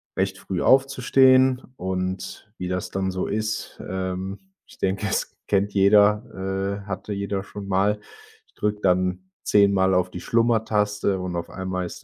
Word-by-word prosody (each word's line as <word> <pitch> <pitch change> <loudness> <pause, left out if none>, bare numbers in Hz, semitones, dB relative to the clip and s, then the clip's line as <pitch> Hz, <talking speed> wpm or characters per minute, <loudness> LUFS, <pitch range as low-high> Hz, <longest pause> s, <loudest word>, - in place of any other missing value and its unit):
recht 95 0 -1
früh 95 -2 -4
aufzustehen. 130 -1 +4
Und 95 +2 -4
wie 90 - -3
das 90 0 -3
dann 95 0 -1
so 95 0 -2
ist 110 0 -3
ähm, 95 - -5 0.2
ich - - -17
denke, 95 +2 -1
es - - -2
kennt 100 0 +1
jeder, 100 -1 +2
äh, - - -17
hatte 100 +1 -5
jeder 100 0 -3
schon 100 -1 -9
mal. 100 +2 +1 0.5
Ich - - -34
drücke 105 0 -2
dann 90 0 0
10 100 -1 +4
Mal 95 -1 +3
auf 90 0 +1
die 90 - -7
Schlummertaste 105 -4 +1
und 90 -1 -4
auf 85 - -4
einmal 95 -1 -3
ist - - -10
100 Hz, 160 wpm, -24 LUFS, 95-105 Hz, 0.5 s, aufzustehen